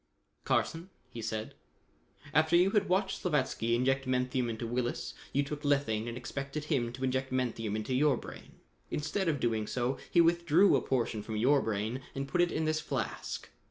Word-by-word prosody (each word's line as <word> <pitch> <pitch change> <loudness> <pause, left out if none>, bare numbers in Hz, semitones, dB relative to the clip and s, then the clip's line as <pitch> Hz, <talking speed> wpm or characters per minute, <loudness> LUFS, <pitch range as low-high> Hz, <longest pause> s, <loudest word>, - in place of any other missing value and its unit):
"Carson," 165 +3 0 0.2
he 115 - -6
said, 110 -1 -4 0.8
"after 160 +2 +4
you 180 +3 +5
had 210 -4 +2
watched 190 +1 +1
Slavatsky 130 -8 +1
inject 135 +2 +1
menthium 125 -1 0
into 115 +1 -4
Willis, 120 +1 -2 0.2
you 140 - +2
took 145 +1 -5
lethane 140 -7 +1
and 120 0 -4
expected 140 +4 -5
him 120 -5 0
to 130 +1 -6
inject 130 0 0
menthium 115 -4 -1
into 110 +4 -2
your 140 0 +3
brain. - - -10 0.4
Instead 165 +6 -1
of 150 -4 +1
doing 110 -3 0
so 125 +2 -1
he 175 - +3
withdrew 170 +2 +5
a - - +2
portion 120 -4 -1
from 110 +1 -4
your 135 +5 +4
brain 110 +4 -2
and 135 0 -3
put 175 +4 +1
it 175 - +2
in 160 - -1
this 155 0 +1
flask. - - -4
130 Hz, 180 wpm, -31 LUFS, 120-155 Hz, 0.8 s, you